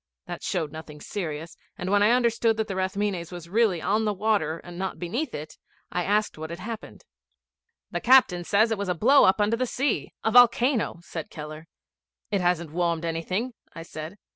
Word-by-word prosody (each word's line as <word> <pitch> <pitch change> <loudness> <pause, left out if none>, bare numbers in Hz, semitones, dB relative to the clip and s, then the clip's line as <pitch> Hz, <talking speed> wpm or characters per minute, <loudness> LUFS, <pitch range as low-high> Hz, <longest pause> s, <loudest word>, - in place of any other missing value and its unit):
That - - -6
showed 165 -6 -2
nothing 155 -1 -9
serious, 165 -2 -5 0.2
and 180 +2 -3
when 205 0 +4
I 210 - +5
understood 230 -2 +2
that 220 -1 -1
the 195 - -4
Rathmines 190 -2 -2
was 175 -2 -8
really 200 -3 +2
on 215 +2 +1
the 210 -1 0
water, 195 -6 +1
and 175 - -10
not 190 0 -3
beneath 230 - -3
it, 150 +1 -8 0.3
I 180 - -1
asked 210 -2 0
what 160 0 -5
had 170 - -6
happened. 220 +4 -8 0.9
'The - - -1
captain 245 -9 +5
says 215 +5 +3
it 220 - -1
was 200 -2 -2
a 180 - +1
blow 265 - +6
up 190 - +4
under 210 +2 +2
the 255 +1 0
sea 245 - -1
a 220 - +1
volcano,' 240 -5 +4
said 165 -2 -6
Keller. 155 +1 -8 0.6
'It 200 -2 +1
hasn't 175 -3 0
warmed 170 0 0
anything,' 185 +9 -2 0.2
I 165 - -7
said. 160 +2 -8
190 Hz, 190 wpm, -26 LUFS, 165-220 Hz, 0.9 s, blow